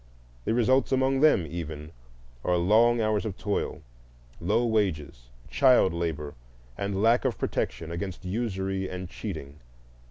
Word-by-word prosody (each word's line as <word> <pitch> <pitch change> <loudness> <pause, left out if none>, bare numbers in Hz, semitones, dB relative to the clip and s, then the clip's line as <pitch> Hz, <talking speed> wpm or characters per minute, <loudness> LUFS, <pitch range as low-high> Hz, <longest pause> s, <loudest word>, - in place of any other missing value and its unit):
The 115 - +1
results 130 +3 +3
among 130 0 +2
them, 150 - +4
even, 80 -1 -6 0.5
are 90 0 +2
long 115 +7 +4
hours 110 -2 +1
of 105 -5 -5
toil, 105 -1 -3 0.6
low 120 - +1
wages, 80 - -1 0.2
child 90 - +4
labor, 80 -4 -3 0.4
and 100 - -2
lack 115 +2 +4
of 130 -4 -1
protection 80 0 -3
against 90 +2 -5
usury 95 -2 -2
and 90 0 -6
cheating. 80 -8 -7
95 Hz, 130 wpm, -27 LUFS, 85-115 Hz, 0.6 s, them